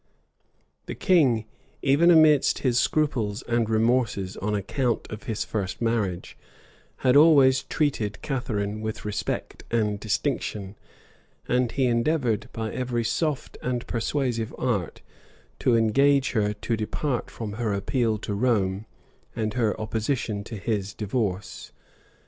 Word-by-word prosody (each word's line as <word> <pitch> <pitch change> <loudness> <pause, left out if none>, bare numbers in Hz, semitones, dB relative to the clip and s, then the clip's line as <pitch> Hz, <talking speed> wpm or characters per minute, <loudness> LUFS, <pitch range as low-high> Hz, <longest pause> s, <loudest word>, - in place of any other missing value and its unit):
[] - - -44
The - - -5
king, 135 - +3 0.4
even 145 +6 +4
amidst 155 -4 +5
his 125 -1 +3
scruples 125 -9 0
and 115 -2 0
remorses 110 -4 +1
on 105 +2 -1
account 120 +4 -1
of 105 -1 -7
his 110 -1 -2
first 100 -3 -3
marriage, 110 -7 -1 0.7
had 125 0 +5
always 140 -4 +6
treated 115 -9 -1
Catharine 110 -6 -2
with 110 -1 -5
respect 105 -1 -3
and 105 -3 0
distinction; 105 -3 -2 0.7
and 125 -1 +1
he 135 - +1
endeavored, 120 -2 +1
by 110 -1 -4
every 120 -2 -1
soft 150 +3 -2
and 125 -1 -2
persuasive 120 -2 -2
art, 105 -10 -2 0.6
to 120 - +3
engage 135 +5 +3
her 105 -4 +1
to 110 +3 -2
depart 120 +4 -2
from 110 -3 -6
her 110 -3 0
appeal 110 +3 0
to 105 - -2
Rome, 100 -2 0 0.5
and 110 -1 -2
her 115 -4 0
opposition 110 -1 -2
to 115 - -7
his 100 -1 -2
divorce. 105 -3 -3
115 Hz, 130 wpm, -25 LUFS, 105-130 Hz, 0.7 s, always